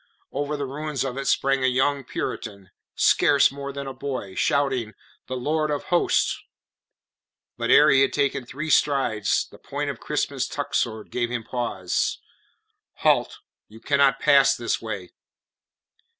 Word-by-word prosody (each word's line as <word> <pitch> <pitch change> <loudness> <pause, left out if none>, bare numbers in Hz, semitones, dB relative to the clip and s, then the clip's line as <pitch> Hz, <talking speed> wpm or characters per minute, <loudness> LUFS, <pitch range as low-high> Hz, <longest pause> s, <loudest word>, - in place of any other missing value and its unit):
Over 145 +2 -2
the 140 - -3
ruins 145 0 -3
of 130 -2 -4
it 140 - -4
sprang 135 -1 +2
a - - +4
young 135 +2 +1
Puritan 100 -5 -6 0.2
scarce 145 -2 +4
more 140 0 -6
than 140 0 -6
a 135 - -6
boy 130 -7 -5
shouting: 130 -4 0 0.3
"The 130 - -4
Lord 155 +4 0
of 145 -1 -2
Hosts!" 175 - +2 1.1
But 120 0 -3
ere 150 +2 +7
he 135 0 +5
had 135 - +3
taken 140 -2 0
three 145 +5 -5
strides 135 -10 +2
the - - -17
point - - -3
of - - -11
Crispin's - - -2
tuck - - -5
sword 110 -2 -1
gave 120 -1 -1
him 120 -1 -3
pause. 115 -7 -2 0.9
"Halt! - - +2 0.3
You 110 +1 -14
cannot 140 +1 +2
pass 140 -1 +5
this 120 - -2
way." 105 -5 -6
135 Hz, 150 wpm, -24 LUFS, 120-140 Hz, 1.1 s, ere